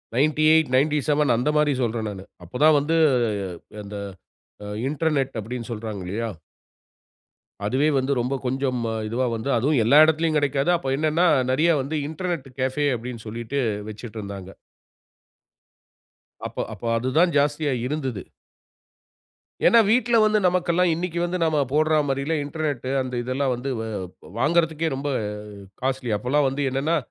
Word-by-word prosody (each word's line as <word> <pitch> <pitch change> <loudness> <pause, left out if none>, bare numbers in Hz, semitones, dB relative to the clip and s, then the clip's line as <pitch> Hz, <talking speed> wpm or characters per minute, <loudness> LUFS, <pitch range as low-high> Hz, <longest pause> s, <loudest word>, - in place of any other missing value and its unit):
98, 155 +2 +3
97 150 +1 +2
அந்த 125 +5 0
மாரி 150 -1 +3
சொல்றேன் 115 -2 -2
நானு. 95 -2 -8 0.2
அப்பதான் 150 - +3
வந்து, 150 +3 0 0.9
அந்த 100 +1 -8 0.9
இன்டர்நெட் 145 -3 0
அப்படினு 115 +2 -6
சொல்றாங்கலையா. 105 -1 -4 1.4
அதுவே 130 +8 +2
வந்து, 130 +2 -1
ரொம்ப 125 +3 -1
கொஞ்சம் 130 0 -1 0.3
இதுவா 120 +4 -1
வந்து, 115 +5 -4
அதுவும் 135 +2 +2
எல்லா 140 +6 +6
இடத்திலயும் 160 0 +1
கெடைக்காது. 145 +3 +1
அப்ப 135 -4 -2
என்னனா, 155 +4 +2 0.2
நெறயா 160 +5 +3
வந்து 145 +4 -3
இன்டர்நெட் 165 -2 -4
கெஃபே, 135 +3 0
அப்படினு 115 -1 -7
சொல்லிட்டு 120 +5 -4 0.3
வச்சுட்ருந்தாங்க. 105 -4 -8 2.0
அப்ப - - -4
அப்ப, - - -14
அதுதான் 150 +9 +2
ஜாஸ்தியா 145 0 +1
இருந்தது. 130 -7 -3 1.5
ஏனா, 235 - +6
வீட்ல 240 +1 +3
வந்து 215 0 +3
நமக்கெல்லாம் 180 -1 +2
இன்னைக்கு 170 0 -3
வந்து, 175 +1 -2
நாம 155 -2 +2
போடுறா 155 +1 +3
மாதிரிலா, 140 +4 -1
இன்டர்நெட் 145 -4 -3
அந்த 130 -1 -5
இதெல்லாம் 130 +2 -1
வந்து, 125 +3 -5
வ், 110 -4 -4 0.3
வாங்குறதற்கே 160 +2 +1
ரொம்ப 140 +2 -3 0.7
காஸ்ட்லி. 130 -2 -1
அப்பலாம் 135 +6 +1
வந்து 135 +2 -4
என்னனா 140 +5 0
140 Hz, 125 wpm, -23 LUFS, 125-155 Hz, 2.0 s, எல்லா